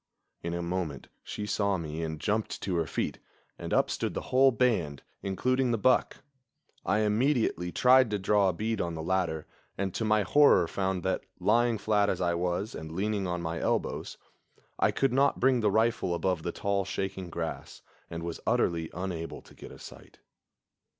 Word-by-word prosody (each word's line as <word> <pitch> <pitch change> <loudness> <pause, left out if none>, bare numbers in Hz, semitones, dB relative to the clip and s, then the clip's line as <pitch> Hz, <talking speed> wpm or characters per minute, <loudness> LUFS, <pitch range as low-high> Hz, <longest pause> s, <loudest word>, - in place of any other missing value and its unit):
In 85 0 -3
a 85 - -3
moment 85 -6 -3
she 105 - -5
saw 100 -2 0
me 80 -1 -5
and 80 -1 -4
jumped 105 +6 -1
to 95 - -1
her 80 -2 0
feet, - - -3 0.4
and - - -6
up - - +3
stood - - -2
the - - -5
whole 135 +1 +6
band, 110 - 0 0.2
including 125 +7 0
the 115 - +1
buck. 130 +4 +2 0.6
I 105 - +1
immediately 110 - +1
tried 130 +2 +5
to 105 - 0
draw 100 0 +3
a - - -1
bead 110 +5 -2
on 85 -1 -3
the 80 - -5
latter, 85 -3 -1 0.3
and 95 -1 -2
to - - -2
my 110 -1 +3
horror 100 - +5
found 95 0 -2
that, - - -1 0.2
lying 115 +4 +3
flat 105 -1 +2
as 90 - -1
I 85 -1 +1
was, 90 +5 -2
and 80 0 -7
leaning 100 +2 -1
on 90 -1 -3
my 80 0 -3
elbows. - - -2 0.6
I - - +4
could 135 -2 +1
not 140 +2 +3
bring 130 0 +4
the 110 -2 +2
rifle 110 -4 +1
above 90 -1 0
the 85 - -3
tall, 100 0 -1
shaking 95 -1 -4
grass, 80 -1 -5 0.3
and 85 0 -5
was 85 -1 -5
utterly 80 -2 +1
unable 85 -2 -5
to - - -17
get - - -11
a - - -11
sight. - - -13
95 Hz, 185 wpm, -29 LUFS, 85-110 Hz, 0.6 s, whole